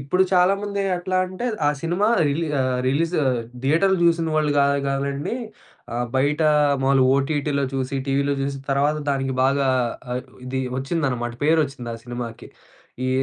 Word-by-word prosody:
ఇప్పుడు 140 Hz, +8 st, +2 dB
చాలామంది 200 Hz, +2 st, +2 dB, 0.2 s
ఎట్లా 185 Hz, +1 st, -2 dB
అంటే, 185 Hz, +6 st, -5 dB, 0.2 s
ఆ! -, -, +4 dB
సినిమా 175 Hz, +6 st, +1 dB, 0.2 s
రిలీ 150 Hz, +4 st, 0 dB, 0.2 s
ఆహ్, 130 Hz, -1 st, 0 dB
రిలీజ్ 165 Hz, +6 st, 0 dB, 0.5 s
థియేటర్ 165 Hz, +8 st, +3 dB
జూసిన 165 Hz, -1 st, +3 dB
వాళ్ళు 155 Hz, -1 st, +2 dB
గా 140 Hz, -, +5 dB, 0.2 s
గాదండి. 140 Hz, +6 st, -2 dB, 0.6 s
ఆ! -, -, -2 dB, 0.2 s
బయట 145 Hz, +4 st, +1 dB, 0.4 s
మాములుగా 135 Hz, -1 st, +4 dB
ఓటీటీలో 140 Hz, 0 st, 0 dB
చూసి 135 Hz, +1 st, -2 dB
టీవీలో 140 Hz, +1 st, +1 dB
జూసి 135 Hz, 0 st, -2 dB
తర్వాత 145 Hz, +2 st, +2 dB
దానికి 135 Hz, -1 st, 0 dB
బాగా 135 Hz, +1 st, +2 dB, 0.5 s
ఆహ్, 125 Hz, +1 st, -2 dB, 0.2 s
ఇది 130 Hz, +1 st, -2 dB, 0.2 s
ఒచ్చిందనమాట 130 Hz, -5 st, -2 dB
పేరు 160 Hz, +2 st, +4 dB
ఒచ్చింది 130 Hz, -3 st, -8 dB
ఆ -, -, -6 dB
సినిమాకి. 120 Hz, -1 st, -7 dB, 0.6 s
ఈ -, -, 0 dB
140 Hz, 145 wpm, -22 LUFS, 135-165 Hz, 0.6 s, గా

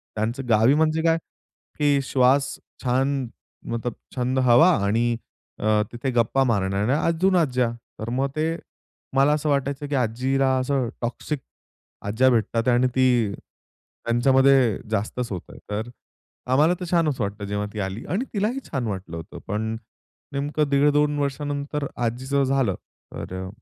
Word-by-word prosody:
त्यांचं 115 Hz, +5 st, -2 dB
गावी 115 Hz, +5 st, +5 dB
म्हणजे 160 Hz, +1 st, +2 dB
काय? 165 Hz, 0 st, +4 dB, 0.6 s
की 145 Hz, -2 st, +3 dB
श्वास 135 Hz, +2 st, +3 dB, 0.3 s
छान, 135 Hz, +1 st, +1 dB, 0.4 s
मतलब 115 Hz, 0 st, -3 dB, 0.2 s
छंद 130 Hz, +1 st, 0 dB
हवा 165 Hz, +10 st, +7 dB
आणि 115 Hz, +3 st, +1 dB, 0.4 s
अ, 105 Hz, 0 st, +2 dB
तिथे 125 Hz, +2 st, -3 dB
गप्पा 120 Hz, +3 st, +2 dB
मारणाऱ्या 105 Hz, +3 st, +1 dB
अजून 180 Hz, +3 st, +2 dB
आज्या. 130 Hz, -8 st, +2 dB, 0.3 s
तर 110 Hz, -, -4 dB
मग 130 Hz, +3 st, 0 dB
ते 160 Hz, +2 st, 0 dB, 0.6 s
मला 140 Hz, +2 st, +5 dB
असं 150 Hz, 0 st, -1 dB
वाटायचं, 140 Hz, +1 st, -1 dB
की 145 Hz, -, -2 dB
आजीला 130 Hz, +2 st, +1 dB
असं 130 Hz, -1 st, 0 dB
टॉक्सिक 130 Hz, +5 st, -3 dB, 0.7 s
आज्या 110 Hz, +6 st, +3 dB
भेटतात 115 Hz, 0 st, +1 dB
आहे 125 Hz, -, +5 dB
आणि 130 Hz, +1 st, +3 dB
ती 125 Hz, -5 st, +3 dB, 0.7 s
त्यांच्यामध्ये 130 Hz, -1 st, +4 dB
जास्तच 110 Hz, +2 st, -2 dB
होत 90 Hz, -, -3 dB
आहे -, -, -12 dB
तर 110 Hz, +3 st, -3 dB, 0.6 s
आम्हाला 150 Hz, +6 st, +4 dB
तर 180 Hz, -, -4 dB
छानच 160 Hz, -6 st, +2 dB
वाटतं, 100 Hz, 0 st, -3 dB
जेव्हा 105 Hz, +1 st, -2 dB
ती 110 Hz, -, -5 dB
आली 95 Hz, +3 st, -4 dB
आणि 200 Hz, -, -1 dB
तिलाही 215 Hz, +5 st, 0 dB
छान 130 Hz, -5 st, -1 dB
वाटलं 95 Hz, -4 st, -5 dB
होतं. 80 Hz, -, -9 dB
पण 110 Hz, +2 st, -2 dB, 0.6 s
नेमकं 145 Hz, +1 st, -1 dB
1.5-2 145 Hz, +1 st, +3 dB
वर्षानंतर 145 Hz, +1 st, -2 dB, 0.2 s
आजीचं 130 Hz, +4 st, 0 dB
झालं, 135 Hz, -1 st, +1 dB, 0.4 s
तर 95 Hz, 0 st, -6 dB
130 Hz, 140 wpm, -24 LUFS, 115-145 Hz, 0.7 s, हवा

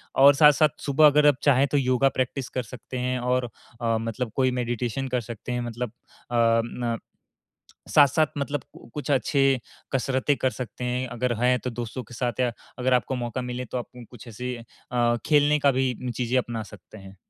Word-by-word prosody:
और 140 Hz, +1 st, +8 dB
साथ-साथ, 150 Hz, 0 st, +6 dB, 0.2 s
सुबह 150 Hz, +2 st, +4 dB
अगर 150 Hz, +1 st, +5 dB
आप 145 Hz, -, +5 dB
चाहें, 140 Hz, -1 st, +4 dB
तो 145 Hz, -, 0 dB
योगा 130 Hz, 0 st, +3 dB
प्रैक्टिस 130 Hz, 0 st, -2 dB
कर 130 Hz, -, -3 dB
सकते 125 Hz, +2 st, -8 dB
हैं 125 Hz, 0 st, -1 dB
और 125 Hz, 0 st, 0 dB, 0.4 s
अ, 115 Hz, -1 st, +1 dB
मतलब 115 Hz, +1 st, -3 dB
कोई 130 Hz, -1 st, +2 dB
मेडिटेशन 120 Hz, +2 st, -2 dB
कर 125 Hz, -1 st, 0 dB
सकते 115 Hz, +2 st, -7 dB
हैं, 125 Hz, 0 st, -1 dB
मतलब 120 Hz, -1 st, -4 dB, 0.4 s
अ, 115 Hz, -1 st, +3 dB
न 120 Hz, -1 st, -3 dB, 0.9 s
साथ-साथ 150 Hz, +1 st, +5 dB
मतलब 145 Hz, -1 st, -2 dB, 0.3 s
कुछ 150 Hz, 0 st, -3 dB
अच्छे 135 Hz, -1 st, +2 dB, 0.3 s
कसरतें 135 Hz, +2 st, +1 dB
कर 130 Hz, -, +1 dB
सकते 125 Hz, -1 st, -7 dB
हैं। 125 Hz, +1 st, -1 dB
अगर 125 Hz, 0 st, -1 dB
हैं, 125 Hz, 0 st, +4 dB
तो 125 Hz, -, -4 dB
दोस्तों 120 Hz, +2 st, -5 dB
के 120 Hz, -, -15 dB
साथ 120 Hz, -1 st, -3 dB
या 125 Hz, -1 st, +1 dB, 0.3 s
अगर 130 Hz, +1 st, +2 dB
आपको 125 Hz, +2 st, +1 dB
मौका 120 Hz, 0 st, -3 dB
मिले, 125 Hz, 0 st, -4 dB
तो 125 Hz, -, -5 dB
आप 120 Hz, -, -3 dB, 0.3 s
कुछ 120 Hz, 0 st, -12 dB
ऐसे 125 Hz, +3 st, -5 dB, 0.4 s
अ, 120 Hz, -1 st, +2 dB
खेलने 150 Hz, 0 st, +4 dB
का 140 Hz, -1 st, +4 dB
भी 130 Hz, 0 st, 0 dB, 0.2 s
चीज़ें 125 Hz, +1 st, 0 dB
अपना 120 Hz, -3 st, -4 dB
सकते 110 Hz, -, -13 dB
हैं। 95 Hz, 0 st, -13 dB
125 Hz, 185 wpm, -25 LUFS, 120-135 Hz, 0.9 s, और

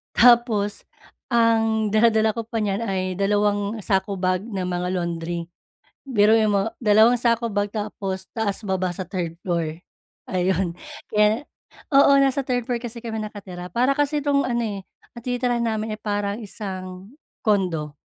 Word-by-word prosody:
tapos 235 Hz, -4 st, +4 dB, 0.5 s
ang 225 Hz, -2 st, +3 dB
dala-dala 220 Hz, 0 st, +4 dB
ko 230 Hz, -, -3 dB
pa 230 Hz, -1 st, -2 dB
niyan 200 Hz, -1 st, -1 dB
ay 185 Hz, -2 st, -2 dB
dalawang 205 Hz, +1 st, +1 dB
sako 195 Hz, +1 st, 0 dB
bag 185 Hz, +1 st, 0 dB
ng 200 Hz, -5 st, -4 dB
mga 180 Hz, 0 st, -2 dB
laundry. 170 Hz, -1 st, -3 dB, 0.6 s
Biruin 220 Hz, -2 st, +4 dB
mo 200 Hz, +2 st, +1 dB
dalawang 220 Hz, +2 st, +5 dB
sako 235 Hz, -1 st, +1 dB
bag 205 Hz, 0 st, 0 dB
tapos 195 Hz, -3 st, -4 dB
taas-baba 195 Hz, -4 st, -1 dB
sa 185 Hz, -, -4 dB
3rd 175 Hz, -4 st, -3 dB
floor, 170 Hz, -3 st, -1 dB, 0.5 s
ayun. 185 Hz, -1 st, 0 dB, 0.4 s
Kaya 210 Hz, +5 st, +3 dB, 0.5 s
oo 280 Hz, 0 st, +7 dB
nasa 275 Hz, 0 st, +2 dB
3rd 245 Hz, -2 st, -1 dB
floor 240 Hz, -1 st, -1 dB
kasi 240 Hz, -1 st, -6 dB
kami 225 Hz, -1 st, -4 dB
nakatira 190 Hz, -4 st, -7 dB
para 250 Hz, +3 st, +3 dB
kasi 290 Hz, 0 st, +1 dB
tong 280 Hz, -1 st, +3 dB
ano, 240 Hz, -1 st, 0 dB
eh, 205 Hz, -3 st, -3 dB, 0.4 s
ang -, -, -7 dB
tinitirahan 245 Hz, -1 st, 0 dB
namin 220 Hz, -1 st, -2 dB
ay -, -, -34 dB
parang 205 Hz, 0 st, -2 dB
isang 190 Hz, -1 st, -7 dB, 0.3 s
condo, 180 Hz, -, 0 dB
210 Hz, 145 wpm, -23 LUFS, 190-230 Hz, 0.6 s, oo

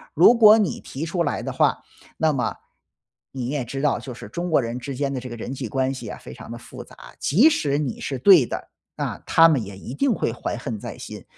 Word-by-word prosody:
如 175 Hz, +9 st, +7 dB
果 220 Hz, -2 st, +8 dB
你 205 Hz, -6 st, 0 dB
提 140 Hz, +4 st, -6 dB
出 170 Hz, +1 st, -1 dB
来 -, -, -2 dB
的 -, -, -3 dB
话， -, -, +1 dB, 0.3 s
那 160 Hz, -1 st, +2 dB
么 125 Hz, -4 st, -1 dB, 0.8 s
你 130 Hz, -3 st, -4 dB
也 145 Hz, -2 st, -2 dB
知 135 Hz, +4 st, -5 dB
道 145 Hz, -3 st, +1 dB
就 125 Hz, +2 st, -8 dB
是 120 Hz, -, -10 dB
中 175 Hz, +9 st, -4 dB
国 155 Hz, -, +5 dB
人 120 Hz, +1 st, -4 dB
之 135 Hz, +2 st, -6 dB
间 140 Hz, +1 st, -2 dB
的 130 Hz, -, -2 dB
这 125 Hz, 0 st, -8 dB
个 120 Hz, -, -6 dB
人 125 Hz, -, -5 dB
际 130 Hz, -2 st, -5 dB
关 130 Hz, +1 st, 0 dB
系 120 Hz, -5 st, -7 dB
啊， -, -, -7 dB
非 65 Hz, -, -11 dB
常 -, -, -11 dB
的 -, -, -6 dB
复 -, -, -10 dB
杂， -, -, -18 dB, 0.2 s
即 205 Hz, -, +4 dB
使 145 Hz, -, 0 dB
你 145 Hz, -5 st, -3 dB
是 135 Hz, -, -3 dB
对 180 Hz, 0 st, +7 dB
的， -, -, -6 dB, 0.3 s
啊， -, -, -4 dB
他 165 Hz, 0 st, +6 dB
们 140 Hz, -7 st, +1 dB
也 100 Hz, -1 st, -9 dB
一 115 Hz, -, -8 dB
定 270 Hz, -, +1 dB
会 115 Hz, -, -1 dB
怀 120 Hz, -, -4 dB
恨 115 Hz, -2 st, -5 dB
在 -, -, -7 dB
心。 -, -, -9 dB
135 Hz, 270 characters per minute, -23 LUFS, 120-165 Hz, 0.8 s, 果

